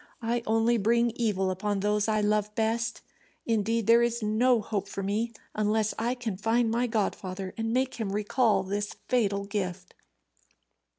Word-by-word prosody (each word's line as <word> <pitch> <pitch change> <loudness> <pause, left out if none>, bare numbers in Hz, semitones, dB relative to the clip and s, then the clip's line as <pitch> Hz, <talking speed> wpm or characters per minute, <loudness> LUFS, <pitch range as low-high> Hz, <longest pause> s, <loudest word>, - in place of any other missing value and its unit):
I 235 +1 0
only 225 +2 +3
bring 235 +3 +2
evil 205 -5 0
upon 200 +2 -1
those 210 +1 +1
I 215 -1 +1
love 210 0 0
best 225 +1 -1 0.4
indeed, 225 0 0
there 230 +2 +6
is 235 -1 0
no 230 +3 +3
hope 205 -2 -3
for 195 - -5
me 215 +4 -1 0.2
unless 215 0 +1
I 240 +3 0
can 230 -6 -4
find 225 +2 +1
my 240 +2 +1
godfather, 195 -4 -2
and 225 -1 -2
make 260 +2 0
him 210 -3 -2
recall 210 0 +2
this 205 +2 -3
fatal 205 -5 +1
gift." 185 -3 -4
215 Hz, 160 wpm, -28 LUFS, 205-230 Hz, 0.4 s, there